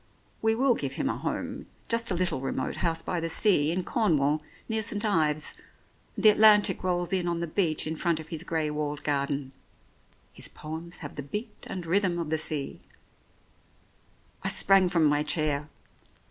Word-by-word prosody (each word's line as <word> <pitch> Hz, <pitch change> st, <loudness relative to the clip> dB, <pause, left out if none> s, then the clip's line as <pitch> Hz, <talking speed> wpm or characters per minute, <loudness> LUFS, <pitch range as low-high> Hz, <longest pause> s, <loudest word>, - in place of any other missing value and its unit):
We 220 Hz, 0 st, +2 dB
will 260 Hz, +2 st, +3 dB
give 140 Hz, -, -3 dB
him 270 Hz, -, -1 dB
a -, -, -1 dB
home— -, -, -4 dB, 0.2 s
just 230 Hz, 0 st, +1 dB
a 185 Hz, -, +1 dB
little 175 Hz, -6 st, 0 dB
remote 135 Hz, 0 st, -3 dB
house 165 Hz, -2 st, -1 dB
by 180 Hz, -, -2 dB
the 165 Hz, 0 st, -2 dB
sea, 160 Hz, -4 st, +3 dB
in 180 Hz, +2 st, -1 dB
Cornwall, 155 Hz, -, +1 dB, 0.3 s
near 220 Hz, -1 st, 0 dB
St. 210 Hz, 0 st, -2 dB
Ives, 155 Hz, -6 st, +2 dB, 0.6 s
and 205 Hz, -, -5 dB
the -, -, +11 dB
Atlantic 210 Hz, -2 st, +6 dB
rolls 175 Hz, -1 st, 0 dB
in 180 Hz, -2 st, +1 dB
on 170 Hz, -1 st, -1 dB
the 170 Hz, -, -1 dB
beach 160 Hz, -1 st, 0 dB
in 160 Hz, +1 st, -3 dB
front 165 Hz, 0 st, 0 dB
of 160 Hz, 0 st, -9 dB
his 165 Hz, -1 st, -4 dB
grey 160 Hz, -3 st, -1 dB
walled 150 Hz, -1 st, -3 dB
garden. 140 Hz, -1 st, -1 dB, 0.8 s
His -, -, -5 dB
poems 160 Hz, +3 st, -8 dB
have 145 Hz, -, -9 dB
the -, -, -2 dB
beat 210 Hz, -, -6 dB
and 185 Hz, -3 st, -5 dB
rhythm 180 Hz, 0 st, +1 dB
of 165 Hz, -3 st, -3 dB
the 160 Hz, -, +1 dB
sea 150 Hz, -2 st, -3 dB, 0.8 s
" -, -, -34 dB
I -, -, +1 dB
sprang 195 Hz, -1 st, +4 dB
from 170 Hz, -3 st, +2 dB
my 145 Hz, 0 st, +3 dB
chair. 150 Hz, -1 st, -1 dB
165 Hz, 185 wpm, -27 LUFS, 150-195 Hz, 0.8 s, the